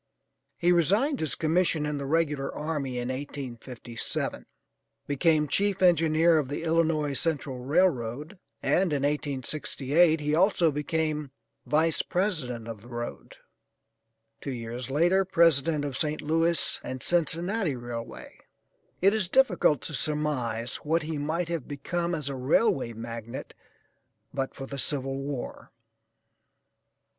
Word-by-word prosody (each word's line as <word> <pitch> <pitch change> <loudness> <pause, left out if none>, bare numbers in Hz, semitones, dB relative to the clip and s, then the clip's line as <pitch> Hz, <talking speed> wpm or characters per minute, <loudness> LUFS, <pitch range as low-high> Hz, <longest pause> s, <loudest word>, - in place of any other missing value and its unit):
He 175 0 +3
resigned 205 - +3
his 155 - 0
commission 160 -1 +1
in 150 -1 -2
the 140 - -4
regular 150 -3 0
army 150 -5 -3
in 120 0 -2
1857; 130 -3 -5 0.6
became 150 +1 +2
chief 200 +4 +1
engineer 165 -1 +5
of 145 - -2
the 145 - -4
Illinois 160 -3 +1
Central 140 -3 -1
Railroad, 145 - 0 0.2
and 185 -2 +2
in 140 -1 0
1868 145 +2 +1
he 150 0 -1
also 175 -1 +4
became 150 0 -1 0.4
Vice 160 +1 +2
President 155 - -2
of 115 -3 -7
the 120 - -14
road; 120 -1 -7 1.0
two - - -5
years 120 +1 -5
later, 175 +7 +3
President 165 -4 +3
of 140 -3 -4
St. 155 0 -1
Louis 165 +1 +1
and 130 -1 -6
Cincinnati 175 +1 +1
Railway. 120 -1 -7 0.6
It 195 +2 +6
is 210 -5 0
difficult 180 - +3
to 155 - -5
surmise 135 -7 -1
what 160 +2 0
he 155 -1 -3
might 160 +4 -1
have 170 -6 -3
become 170 +5 -2
as 150 -4 -5
a 140 - -2
railway 130 - +2
magnate 115 +2 -7 0.8
but 135 -1 -3
for 135 - -6
the 140 +1 -6
civil 135 -1 0
war. 135 -2 -6
150 Hz, 130 wpm, -27 LUFS, 135-165 Hz, 1.0 s, It